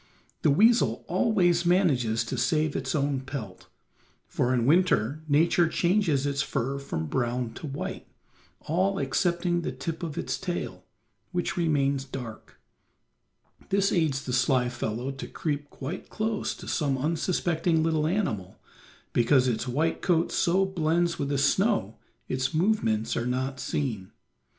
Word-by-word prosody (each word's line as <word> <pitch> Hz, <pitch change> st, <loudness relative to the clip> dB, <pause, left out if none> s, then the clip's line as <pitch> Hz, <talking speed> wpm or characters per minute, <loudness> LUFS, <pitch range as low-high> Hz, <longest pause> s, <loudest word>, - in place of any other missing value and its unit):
The -, -, +3 dB
weasel 195 Hz, -, +4 dB
always 180 Hz, -3 st, +2 dB
manages 140 Hz, -, +2 dB
to 115 Hz, -, -4 dB
save 155 Hz, -3 st, +1 dB
its -, -, -2 dB
own 140 Hz, -2 st, +1 dB
pelt, 130 Hz, -8 st, -7 dB, 0.6 s
for 125 Hz, -, 0 dB
in 120 Hz, -2 st, +1 dB
winter 155 Hz, -, +3 dB
Nature 165 Hz, +3 st, +4 dB
changes 170 Hz, -5 st, +1 dB
its 140 Hz, -1 st, 0 dB
fur 135 Hz, +1 st, -2 dB
from 80 Hz, -13 st, -4 dB
brown 120 Hz, -, -1 dB
to 155 Hz, -, -7 dB
white, 140 Hz, 0 st, -5 dB, 0.5 s
all 190 Hz, +5 st, 0 dB
excepting 175 Hz, +5 st, 0 dB
the 145 Hz, -, -3 dB
tip 155 Hz, +5 st, -5 dB
of 160 Hz, -4 st, -5 dB
its -, -, -2 dB
tail, 180 Hz, -2 st, -4 dB, 0.5 s
which 175 Hz, -1 st, -1 dB
remains 140 Hz, -5 st, +1 dB
dark. 125 Hz, -5 st, -9 dB, 1.1 s
This 195 Hz, 0 st, +2 dB
aids 155 Hz, -6 st, +1 dB
the 125 Hz, -, -3 dB
sly 125 Hz, 0 st, +2 dB
fellow 120 Hz, +1 st, -3 dB
to 135 Hz, -, -7 dB
creep 145 Hz, -2 st, -3 dB
quite 140 Hz, +6 st, -7 dB
close 215 Hz, 0 st, -2 dB
to -, -, -11 dB
some 140 Hz, -4 st, 0 dB
unsuspecting 165 Hz, +2 st, 0 dB
little 160 Hz, -1 st, +1 dB
animal, 110 Hz, -, -2 dB, 0.5 s
because 125 Hz, +2 st, +4 dB
its 120 Hz, 0 st, -1 dB
white 155 Hz, +7 st, 0 dB
coat 170 Hz, -2 st, +2 dB
so 185 Hz, +2 st, +2 dB
blends 170 Hz, -1 st, 0 dB
with 140 Hz, -2 st, -1 dB
the 140 Hz, -, 0 dB
snow 145 Hz, -, +1 dB, 0.3 s
its 130 Hz, +2 st, -1 dB
movements 155 Hz, -, +1 dB
are 120 Hz, -, -1 dB
not 130 Hz, +2 st, -2 dB
seen. 115 Hz, -13 st, -3 dB
145 Hz, 140 wpm, -27 LUFS, 130-175 Hz, 1.1 s, weasel